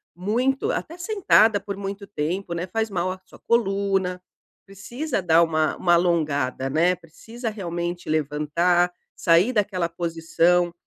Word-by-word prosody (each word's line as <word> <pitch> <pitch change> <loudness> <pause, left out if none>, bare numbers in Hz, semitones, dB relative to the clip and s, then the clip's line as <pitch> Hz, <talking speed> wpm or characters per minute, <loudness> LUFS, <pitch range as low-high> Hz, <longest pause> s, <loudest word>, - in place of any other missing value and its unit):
muito 240 +9 0
até 335 - -4
sentada 355 - +3
por 200 0 -6
muito 200 0 -6
tempo, 175 +1 -3
né, 170 +1 -3
faz 220 +4 -2
mal 185 -2 -1
à 185 - -7
sua - - -16
coluna, 195 -5 0 0.4
precisa 235 +6 -4
dar 170 -1 +4
uma 155 -1 0
uma 175 - +2
alongada, 155 -7 +1
né, 170 +5 +2
precisa 220 +8 -8
realmente 175 -4 -4
levantar, 155 +4 +1 0.2
sair 170 +8 +3
daquela 190 -5 0
posição, 170 +1 +1
180 Hz, 135 wpm, -23 LUFS, 170-205 Hz, 0.4 s, dar